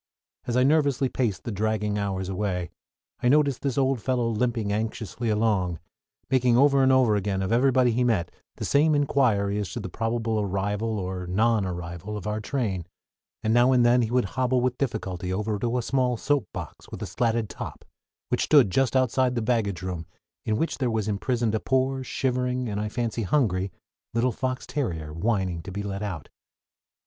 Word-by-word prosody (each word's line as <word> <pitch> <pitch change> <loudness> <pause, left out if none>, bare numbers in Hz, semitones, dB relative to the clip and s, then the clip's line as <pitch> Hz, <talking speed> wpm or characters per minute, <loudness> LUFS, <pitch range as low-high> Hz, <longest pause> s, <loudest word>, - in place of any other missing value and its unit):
As 120 0 0
I 125 - +5
nervously 140 -2 +3
paced 115 -9 -1
the 120 - -4
dragging 105 0 -1
hours 95 -2 -2
away 95 -3 -2 0.5
I 125 - +3
noticed 140 -2 +3
this 140 -2 -2
old 135 -3 +2
fellow 120 -2 0
limping 115 -2 0
anxiously 110 +1 -3
about, 105 -5 +1 0.5
making 125 -2 +4
over 140 +1 +5
and 130 0 +5
over 130 -5 +4
again 100 -1 -1
of 95 - -2
everybody 125 0 +4
he 125 +2 +1
met 105 -8 +1 0.2
the - - -4
same 150 +2 +3
inquiry 115 -8 +2
as 100 - -3
to - - -3
the 95 - -5
probable 115 +2 -1
arrival 105 +2 -1
or 90 -1 -4
non 110 +3 +2
arrival 90 +3 -5
of 100 - -8
our 105 0 -1
train; 105 - -2 0.6
and 110 - +2
now 120 +2 +5
and 125 -2 +4
then 120 +1 +5
he 115 - 0
would 125 -1 +2
hobble 130 0 +2
with 125 0 -1
difficulty 95 -8 -2
over 105 +2 -1
to 120 +2 0
a 125 - -1
small 125 -1 +1
soap 140 -4 0
box, - - -8
with - - -7
a - - -2
slatted 115 -2 0
top, - - -8 0.4
which - - +1
stood 95 - +5
just 135 +5 +1
outside 130 0 +2
the 120 - 0
baggage 110 -6 0
room, 90 -3 -4 0.4
in 110 -1 +1
which 165 +4 -1
there 130 -3 +1
was 110 -2 -1
imprisoned 115 +2 0
a 110 - +1
poor, 130 +1 0
shivering, 125 -1 -1
and 105 -1 -2
I 105 - -2
fancy 115 0 -2
hungry, 100 -6 +1 0.4
little 120 +2 +2
fox 130 +2 -3
terrier, 90 - -3
whining 95 -1 -1
to 95 - -8
be 100 +2 -4
let 100 0 -4
out. 95 -8 -4
115 Hz, 190 wpm, -26 LUFS, 100-125 Hz, 0.6 s, I